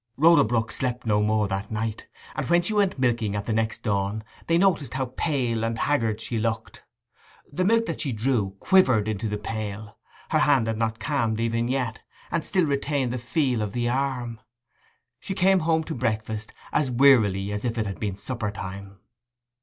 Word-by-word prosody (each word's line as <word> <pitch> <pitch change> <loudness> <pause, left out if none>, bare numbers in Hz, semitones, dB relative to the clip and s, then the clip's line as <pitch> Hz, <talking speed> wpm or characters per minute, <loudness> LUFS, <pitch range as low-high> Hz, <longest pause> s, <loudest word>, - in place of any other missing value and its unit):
Rhoda 165 +3 +6
Brook 115 +1 0
slept 125 -1 -2
no 105 -2 +2
more 105 0 +2
that 95 +2 -3
night, 110 0 -3 0.3
and - - -3
when 175 0 +4
she 215 - -1
went 200 -5 +2
milking 120 -5 +1
at 100 0 -3
the 115 - -1
next 110 +1 -1
dawn 100 0 -1 0.2
they 165 - +3
noticed 170 -8 +2
how 130 -2 -2
pale 125 -8 0
and 115 0 -1
haggard 115 -6 +1
she 115 - -3
looked. 110 0 -3 0.7
The 185 - 0
milk 230 +4 +3
that 165 - -3
she 145 -4 -1
drew 110 -4 0
quivered 130 - +4
into 110 0 -2
the 105 - -2
pail; 105 0 -6 0.3
her 155 - +2
hand 140 -6 +4
had 110 -1 -2
not 110 -1 0
calmed 115 -3 -1
even 115 0 0
yet, 125 -3 -2 0.3
and 170 -1 0
still 185 -4 +1
retained 140 -3 0
the 125 - -3
feel 125 -1 0
of 105 -1 -3
the 120 -1 0
arm. 125 -3 -2 0.8
She 195 - -5
came 190 +1 +4
home 160 -1 +1
to 160 - -5
breakfast 110 -2 -2 0.2
as 145 -3 +2
wearily 110 -7 +4
as 105 0 -3
if 120 -1 -2
it 110 - 0
had 100 -1 -5
been 100 -3 -2
suppertime. 100 -4 -5
115 Hz, 185 wpm, -25 LUFS, 110-140 Hz, 0.8 s, Rhoda